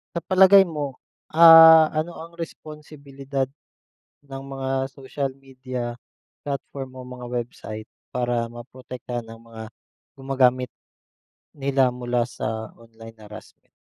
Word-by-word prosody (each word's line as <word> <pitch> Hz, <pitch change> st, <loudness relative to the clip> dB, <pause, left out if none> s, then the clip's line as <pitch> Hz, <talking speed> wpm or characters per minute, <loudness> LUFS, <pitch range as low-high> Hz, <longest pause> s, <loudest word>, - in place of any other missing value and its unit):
Sa -, -, 0 dB
palagay 190 Hz, +2 st, +6 dB
mo, 145 Hz, -5 st, -5 dB, 0.3 s
ah, 165 Hz, -1 st, +9 dB
ano 155 Hz, +3 st, -1 dB
ang 170 Hz, +1 st, -11 dB
responsibilidad, 145 Hz, -4 st, -6 dB, 0.8 s
ng 135 Hz, -1 st, -8 dB
mga 135 Hz, -1 st, -4 dB, 0.2 s
social 135 Hz, 0 st, -5 dB
media 130 Hz, -3 st, -7 dB, 0.5 s
platform 135 Hz, -1 st, -6 dB
o 130 Hz, -, -9 dB
mga 125 Hz, -1 st, -9 dB
website 120 Hz, -3 st, -6 dB, 0.2 s
para 120 Hz, -1 st, -1 dB
maprotektahan 120 Hz, 0 st, -8 dB
ang 115 Hz, 0 st, -12 dB
mga 110 Hz, -1 st, -9 dB, 0.5 s
gumagamit, 130 Hz, -2 st, +1 dB, 0.9 s
nila 135 Hz, -2 st, +2 dB
mula 125 Hz, -1 st, -2 dB
sa 110 Hz, -2 st, -5 dB
online 115 Hz, -1 st, -14 dB
harassment? 105 Hz, +1 st, -14 dB
130 Hz, 110 wpm, -23 LUFS, 120-145 Hz, 0.9 s, ah